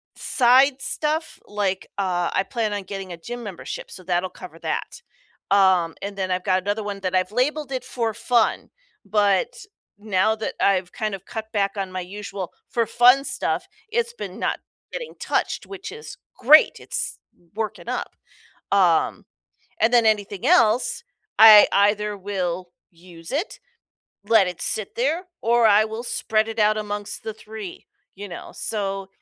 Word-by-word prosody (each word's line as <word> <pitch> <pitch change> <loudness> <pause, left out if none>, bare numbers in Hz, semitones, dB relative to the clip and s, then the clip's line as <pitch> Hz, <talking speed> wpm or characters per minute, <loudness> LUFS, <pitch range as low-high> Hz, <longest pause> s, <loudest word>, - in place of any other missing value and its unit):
side 260 +2 +4
stuff, 310 +3 -2
like, 195 -3 -2
uh, 180 -3 0
I - - +2
plan 230 -5 -1
on 205 - -2
getting 190 -1 -7
a - - -8
gym 240 +8 -7
membership, 195 -5 -7
so, 185 - -10
that'll 180 +1 -1
cover 180 -3 -11
that, 485 - -4 0.5
um, 190 -4 +4
and 200 0 -5
then 190 -1 -2
I've 180 0 -1
got 185 0 +2
another 205 +2 -1
1 205 -1 -5
that 185 -1 -2
I've 185 +1 +1
labeled 275 +4 -1
it 260 -2 -3
for 235 -3 -2
fun, 235 0 +1 0.4
but 200 -2 +2 0.5
now 210 +1 +1
that 220 - -4
I've 185 -2 +2
kind 215 -2 -3
of 190 - -12
cut 220 -2 -5
back 200 -2 +1
on 195 -1 -3
my 185 - -4
usual 195 0 -7 0.2
for 230 -1 +1
fun 250 +3 +5
stuff, - - -1 0.2
it's 470 +1 0
been - - -7
not - - -1 0.3
getting 485 -1 -6
touched, - - -1
which 390 -1 -8
is 450 +1 -10 0.2
great, 305 +5 +7
it's - - -3 0.4
working 220 -1 -4
up, - - -3 0.6
um, 180 -5 +2 0.6
and 230 +2 +3
then 235 -2 +5
anything 205 -1 0
else, 250 -9 +3 0.4
I 215 -1 +10
either 205 +1 +2
will 185 -2 -3 0.2
use 170 -1 -13
it, 300 +9 -3 0.7
let 220 -4 +5
it 180 -2 -6
sit 215 -3 -2
there, 300 +9 0 0.2
or 235 +1 +3
I 210 +1 +5
will 220 +2 -6
spread 220 -2 0
it 225 - -5
out 215 0 +3
amongst 205 +1 -4
the 220 0 -4
3, 215 -3 -9 0.3
you 205 +1 -7
know? 175 - -9
So, 195 -2 -3
210 Hz, 160 wpm, -23 LUFS, 190-235 Hz, 0.7 s, I